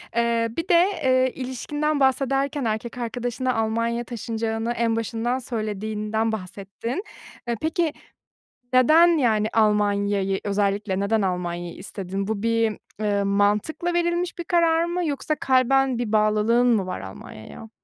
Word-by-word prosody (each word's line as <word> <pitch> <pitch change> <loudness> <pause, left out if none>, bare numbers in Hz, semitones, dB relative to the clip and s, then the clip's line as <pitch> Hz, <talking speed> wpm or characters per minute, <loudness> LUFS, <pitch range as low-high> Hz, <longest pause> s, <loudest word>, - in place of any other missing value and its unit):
Eee, 235 -1 +1
bir 330 +2 -2
de, 345 0 +6 0.2
eee, 255 -1 +3
ilişkinden 290 +4 -2
bahsederken 270 +1 +1
erkek 225 +3 -3
arkadaşına 245 +2 -2
Almanya'ya 230 +1 0
taşınacağını 225 -1 -3
en 230 -1 0
başından 230 +3 -1
söylediğinden 220 -1 -2
bahsettin. 205 - -5 0.4
Eee, 235 - 0
peki 320 0 0 0.8
neden, 310 +7 +6
yani, 220 -6 +2
Almanya'yı, 205 -2 +2
özellikle 200 -1 0
neden 210 +2 +1
Almanya'yı 175 -2 -3
istedin? 195 0 -5
Bu 215 -1 -3
bir, 230 -2 +1 0.2
ııı, 205 -1 +1
mantıkla 205 - +1
verilmiş 345 +1 0
bir 345 - -4
karar 335 -1 +3
mı 345 +1 -2
yoksa 300 +1 -1
kalben 265 -1 +2
bir 235 -3 -3
bağlılığın 215 +3 +3
mı 220 -6 +2
var 185 - -4
Almanya'ya? 110 - -10
230 Hz, 130 wpm, -24 LUFS, 210-260 Hz, 0.8 s, de